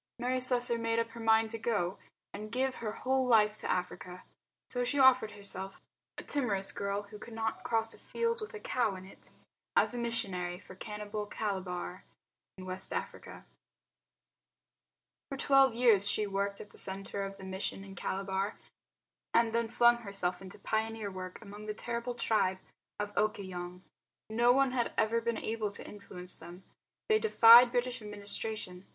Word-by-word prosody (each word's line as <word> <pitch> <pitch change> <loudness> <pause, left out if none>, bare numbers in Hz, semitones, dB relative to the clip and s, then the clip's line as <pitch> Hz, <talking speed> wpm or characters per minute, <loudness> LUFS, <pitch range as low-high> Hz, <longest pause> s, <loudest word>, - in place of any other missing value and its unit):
Mary 250 +1 0
Slessor 245 -2 +3
made 230 0 0
up 230 0 +1
her 235 - -10
mind 225 0 +3
to 225 - -4
go 205 -6 0
out 195 - -18 0.3
and 215 +1 -7
give 260 +2 0
her 220 -2 -3
whole 260 +3 0
life 215 -3 +5
to - - -2
Africa. 180 0 -3 0.4
So 245 0 -1
she 285 +4 0
offered 255 -5 +6
herself, 195 -1 -7 0.4
a - - -6
timorous 210 -9 -1
girl 200 0 -2
who 210 +1 -12
could 225 +1 -10
not 225 -1 -2
cross 225 -1 0
a - - -14
field 465 0 -1
with 430 +1 -6
a - - -6
cow 240 - 0
in 185 0 -9
it, 195 - -14 0.5
as - - +4
a 245 - -2
missionary 195 -7 -1
for 185 - -13
cannibal 210 +1 -5
Calabar, 185 -3 -4 0.5
in 185 - -8
West 185 +1 -5
Africa. - - -6 1.8
For 275 - -4
twelve 270 -3 +5
years 220 -5 +4
she 210 - +1
worked 200 0 -2
at 210 - -10
the - - -7
centre 195 +1 -4
of 195 0 -6
the 195 - -11
mission 190 +1 -4
in 195 -1 -10
Calabar 195 +2 -2 0.8
and 230 -1 +4
then 230 0 +1
flung 240 +1 +5
herself 200 -6 -2
into 190 -2 -10
pioneer 220 -1 -2
work 185 -1 -7
among 205 +1 -10
the 210 - -3
terrible 235 +2 -3
tribe 200 -5 +1 0.4
of 205 0 -3
Okoyong. 185 -4 -2 0.5
No 240 +2 +5
one 270 +1 +4
had 245 -2 0
ever 230 +1 +2
been 235 -1 -1
able 220 -1 -2
to 200 - -6
influence 180 -3 -7
them. 175 +2 -11 0.4
They 435 -1 +4
defied 240 - +8
British 245 0 -1
administration. 205 -2 -3
215 Hz, 170 wpm, -32 LUFS, 195-235 Hz, 1.8 s, defied